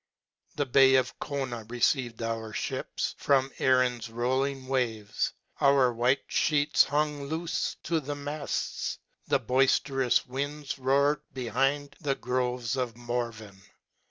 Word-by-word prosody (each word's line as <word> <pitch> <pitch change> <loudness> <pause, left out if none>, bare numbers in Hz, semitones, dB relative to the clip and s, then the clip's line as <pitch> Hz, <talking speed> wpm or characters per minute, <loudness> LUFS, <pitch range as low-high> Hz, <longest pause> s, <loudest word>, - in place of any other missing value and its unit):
The 145 - 0
bay 135 +1 +6
of 130 -1 +1
Cona 130 -5 -3
received 120 -1 0
our 115 -1 -3
fliips - - -3
* - - -40
from 135 -1 +3
Erin's 125 -3 +2
rolling 130 +3 -1
waves. 115 -6 -1 0.3
Our 135 -3 +4
white 125 +4 +1
flieets 150 -1 +3
hung 145 -1 -1
loofe 165 +2 -2
to 165 -1 0
the 145 0 -5
mafts. 145 +1 -3 0.3
The 140 - +3
boifterous 130 +1 +2
winds 140 +2 -4
roared 140 +3 +2
behind 135 +4 0
the 140 -2 0
groves 125 -1 -1
of 125 -3 -3
Morven. 115 -4 -4
130 Hz, 125 wpm, -28 LUFS, 120-140 Hz, 0.3 s, bay